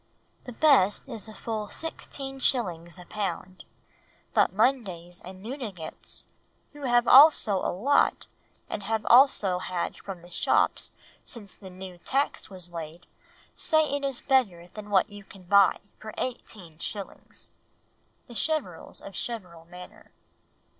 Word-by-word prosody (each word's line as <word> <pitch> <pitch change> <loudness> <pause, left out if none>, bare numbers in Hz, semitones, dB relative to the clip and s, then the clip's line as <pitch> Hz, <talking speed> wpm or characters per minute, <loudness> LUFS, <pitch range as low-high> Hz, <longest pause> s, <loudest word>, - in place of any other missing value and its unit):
The 250 - -7
best 245 -6 +4
is 230 -4 -6
full 215 0 -4
16s. 250 - -3
a 180 - -11
pound, 185 -2 -5 0.7
but - - +4
Mundays 190 -7 0
and 185 +1 -11
Newdigates 220 - -7 0.5
who 290 -1 -7
have 240 -1 +3
also 265 -7 +7
a - - -1
lot 270 +11 +2 0.4
and 205 - -4
have 220 +1 -2
also 235 -8 +5
had 180 -1 -3
from 190 -3 -8
the 175 +1 -15
shops - - +1 0.3
since 210 -5 -6
the 190 - -12
new 185 -1 -10
tax 275 +9 -1
was 180 -3 -9
laid, 165 +1 -8 0.5
say 315 -3 +3
it 285 - -3
is 275 -3 -1
better 195 -11 +1
than 210 +2 -10
what 195 0 +3
you 205 0 -10
can 195 -1 -15
buy 200 +2 +5 0.2
for 215 0 -8
18s." 195 -9 -6
(_The 205 +4 -10
Cheverels 280 - -2
of 195 - -10
Cheverel 180 -9 -5
Manor. 180 0 -12
205 Hz, 130 wpm, -27 LUFS, 180-250 Hz, 0.7 s, also